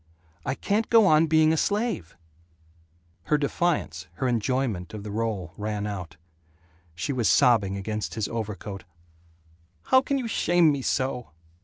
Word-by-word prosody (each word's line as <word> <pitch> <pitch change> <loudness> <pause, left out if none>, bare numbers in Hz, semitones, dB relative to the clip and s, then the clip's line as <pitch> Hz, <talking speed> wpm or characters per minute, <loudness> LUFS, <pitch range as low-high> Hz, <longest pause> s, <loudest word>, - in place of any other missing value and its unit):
I 135 - 0
can't 210 +7 -1
go 225 -2 +6
on 160 -2 +5
being 155 0 +4
a - - 0
slave 205 - -1 0.6
" 85 +2 -37
Her 150 - +2
defiance, 160 +3 -1
her 130 - -2
enjoyment 115 -5 -1
of 105 - -7
the 105 - -6
role, 105 -5 -3
ran 105 -1 -3
out. 90 -6 -6 0.8
She 90 +11 -3
was 120 -4 +1
sobbing 100 -5 +4
against 105 +2 -4
his 110 -3 -1
overcoat, 105 -3 -5 1.0
"How 260 - +4
can 275 +1 -1
you 255 -3 -3
shame 175 -6 +3
me 140 -2 -2
so?" 130 -3 -1
115 Hz, 150 wpm, -26 LUFS, 100-155 Hz, 1.0 s, go